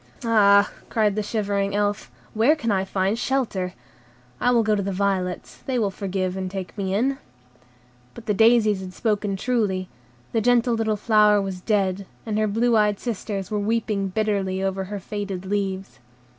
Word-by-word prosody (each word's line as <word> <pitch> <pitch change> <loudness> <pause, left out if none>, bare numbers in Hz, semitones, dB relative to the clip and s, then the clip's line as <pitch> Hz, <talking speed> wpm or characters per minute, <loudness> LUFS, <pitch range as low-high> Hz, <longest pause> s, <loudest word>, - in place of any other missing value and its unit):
"Ah," 200 -3 +5 0.2
cried 210 -3 +1
the 215 - 0
shivering 200 -2 -1
Elf, 205 -7 -1 0.2
"where 230 +8 +4
can 230 -8 -2
I 190 -1 +1
find 195 +3 0
shelter? 220 -10 -1 0.6
I - - +2
will 235 -2 +4
go 215 0 +2
to 205 - +1
the 195 0 -2
violets: 190 -2 -2
they 260 -2 0
will 210 -4 +1
forgive 190 -1 -2
and 190 -1 -3
take 190 -1 -6
me 195 -2 -2
in." 270 +6 +1 1.0
But 235 - -11
the 210 - +1
daisies 220 -2 +4
had 185 -1 -8
spoken 210 -3 0
truly; 195 -5 -1 0.4
the 225 - +1
gentle 245 +1 +3
little 220 -2 0
flower 210 -1 +4
was 190 -2 -4
dead, 195 -2 0 0.2
and 215 -1 -1
her 215 - +2
blue 230 +3 +2
eyed 210 -2 +2
sisters 205 -4 -4
were 210 - 0
weeping 210 -2 0
bitterly 195 -2 -1
over 190 0 -1
her 205 +1 -5
faded 195 -1 -5
leaves. 195 -4 -3
205 Hz, 170 wpm, -23 LUFS, 195-220 Hz, 1.0 s, Ah